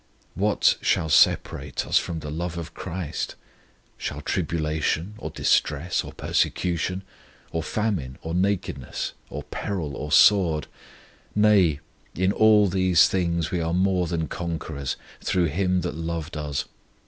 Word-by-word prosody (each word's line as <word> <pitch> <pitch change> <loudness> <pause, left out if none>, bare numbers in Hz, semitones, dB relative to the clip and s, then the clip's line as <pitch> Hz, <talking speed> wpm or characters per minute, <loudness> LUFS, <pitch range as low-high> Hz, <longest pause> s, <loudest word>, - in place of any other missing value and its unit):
What 100 +3 +2
"shall 80 - +1
separate 75 - +2
us - - +4
from 80 -2 -4
the 75 -1 -6
love 85 +2 -3
of 80 -3 -6
CHRIST? 85 -4 -4 0.6
shall - - -4
tribulation, 80 +3 -1
or - - -5
distress, 75 +4 +1
or - - -8
persecution, 90 +2 -1 0.5
or 80 - -1
famine, 85 -10 -2
or 80 - -4
nakedness, 90 -8 -1 0.2
or 75 +1 -6
peril, 75 -1 -4
or 75 +3 -5
sword?... 85 -5 +5 0.7
Nay, 100 -8 +4 0.3
in 95 +3 +2
all 105 -1 +5
these 95 -2 +4
things 85 -3 0
we 90 - 0
are 85 +1 -1
more 90 -1 +2
than 80 -1 -2
conquerors, 80 -5 -4 0.3
through 90 -2 +2
Him 90 0 +1
that 90 - -3
loved 80 0 -4
us. 75 -2 -2
85 Hz, 135 wpm, -25 LUFS, 80-95 Hz, 0.7 s, sword